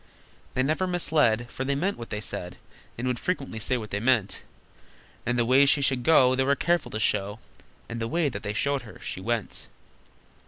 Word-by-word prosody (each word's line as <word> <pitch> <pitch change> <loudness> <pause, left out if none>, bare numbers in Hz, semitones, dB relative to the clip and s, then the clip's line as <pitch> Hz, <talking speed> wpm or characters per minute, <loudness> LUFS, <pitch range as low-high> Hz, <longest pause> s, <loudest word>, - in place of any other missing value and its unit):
They 130 - +2
never 155 +7 0
misled, 150 -10 +2
For 130 - -4
they 140 +1 0
meant 185 +8 0
what 115 - -9
they 105 - -4
said, 90 -2 -5 0.4
And 120 - -4
would 125 -1 -1
frequently 140 -10 -3
say 125 +4 +1
what 110 -3 -7
they 100 - -1
meant, 115 -4 +1 0.9
And 120 0 +1
the 120 - +2
way 135 +3 +5
she 140 0 +4
should 130 -2 +2
go 130 -2 +5
They 130 +1 +2
were 140 +1 +3
careful 170 +3 0
to 110 - -4
show, 100 -1 0 0.5
And 115 - -5
the 115 - -1
way 165 +5 +1
that 130 - -4
they 105 -1 -3
showed 140 +4 0
her, 110 - -12
she 95 - -5
went. 115 +1 -2
125 Hz, 205 wpm, -26 LUFS, 110-140 Hz, 0.9 s, way